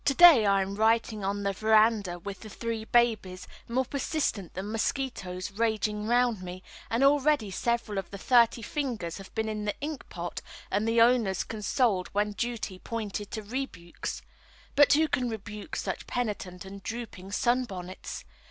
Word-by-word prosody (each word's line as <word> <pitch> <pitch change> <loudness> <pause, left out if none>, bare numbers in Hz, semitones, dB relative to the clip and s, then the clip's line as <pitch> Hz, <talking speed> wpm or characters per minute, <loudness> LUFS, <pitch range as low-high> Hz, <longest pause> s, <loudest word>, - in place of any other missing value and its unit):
To 275 - +3
day 315 -11 +9
I 195 -1 +4
am 195 +1 -5
writing 220 0 +2
on 200 +1 -1
the 200 0 0
verandah 215 -3 +3
with 195 +3 -7
the 215 - -10
three 225 0 -4
babies, 220 -6 +1 0.2
more 255 +3 0
persistent 265 - -2
than 195 +3 -4
mosquitoes, 205 -6 -2
raging 215 0 0
round 240 -3 +2
me, 185 0 -7 0.3
and 230 +4 +1
already 280 -5 +3
several 235 0 -1
of 195 - -7
the 200 - -7
thirty 235 +2 +4
fingers 225 - -3
have 195 - -11
been 220 -1 0
in 215 -1 -3
the 205 - -2
ink 295 -2 -5
pot 175 0 -5 0.3
and 205 +3 +1
the 230 0 +4
owners 230 -6 +4
consoled 215 -3 0
when 210 +1 +1
duty 220 -4 -3
pointed 210 -2 -4
to 220 - -5
rebukes. 205 -7 -5 0.5
But 290 +1 +6
who 315 +2 +4
can 255 -5 0
rebuke 210 +2 -6
such - - -3
penitent 200 -6 -3
and 195 +1 -9
drooping 215 -4 -6
sunbonnets? 215 -8 -2
220 Hz, 160 wpm, -29 LUFS, 195-240 Hz, 0.5 s, day